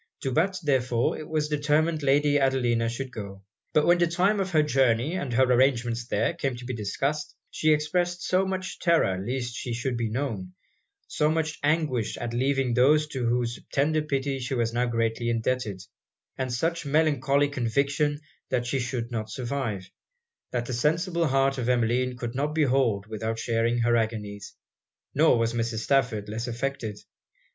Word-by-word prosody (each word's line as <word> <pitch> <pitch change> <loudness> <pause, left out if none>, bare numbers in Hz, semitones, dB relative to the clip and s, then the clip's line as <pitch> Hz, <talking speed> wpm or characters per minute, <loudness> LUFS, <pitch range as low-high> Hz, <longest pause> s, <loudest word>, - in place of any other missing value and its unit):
To 135 - -1
Bath, 180 +6 +1
therefore, 125 -4 +1
it 155 - -8
was 155 -1 0
determined 150 +2 +1
Lady 145 +1 +3
Adelina 120 -4 +1
should 130 +2 -5
go. 100 -4 -8 0.3
But 150 - +3
when 175 0 +4
the 175 - +4
time 185 +5 +2
of 190 -1 -1
her 155 -4 +3
journey, 135 0 +2
and 160 -9 -3
her 130 - +4
arrangements 120 -2 +2
there, - - 0
came 140 -7 -2
to 120 0 -9
be 130 - -4
discussed, 135 +8 -2 0.2
she 155 - +2
expressed 175 +4 0
so 185 +1 +2
much 190 -1 -4
terror 95 - +2
least 120 +1 -3
she 120 -2 -4
should 120 +1 -2
be 115 -1 -1
known, 110 -7 -3 0.5
so 150 - +1
much 155 -1 -1
anguish 145 -7 0
at 120 -1 -4
leaving 135 0 +1
those 145 +5 +4
to 130 -5 -2
whose 120 0 0
tender 155 +3 +2
pity 140 -2 -2
she 130 +1 -3
was 115 -2 0
so 120 +1 0
greatly 115 0 0
indebted, 115 -4 -1 0.5
and 130 -1 -3
such 165 +7 -1
melancholy 145 -1 +2
conviction 140 +3 0 0.3
that 125 -2 0
she 135 +2 -1
should 120 -1 -3
not 110 -2 -3
survive, 120 -5 -3 0.6
that 120 -1 -2
the 125 - -4
sensible 165 +6 +1
heart 135 0 +2
of 120 0 -1
Emmeline 125 +1 +1
could 120 -1 -4
not 145 +3 -2
behold 130 -9 +2
without 110 +1 -3
sharing 115 +1 0
her 120 0 +2
agonies; 105 -3 -3 0.6
nor 150 -3 +4
was 115 0 0
Mrs. 115 -1 -2
Stafford 120 -7 +1
less 115 +3 -4
affected. 120 -3 -3
130 Hz, 170 wpm, -26 LUFS, 115-150 Hz, 0.6 s, when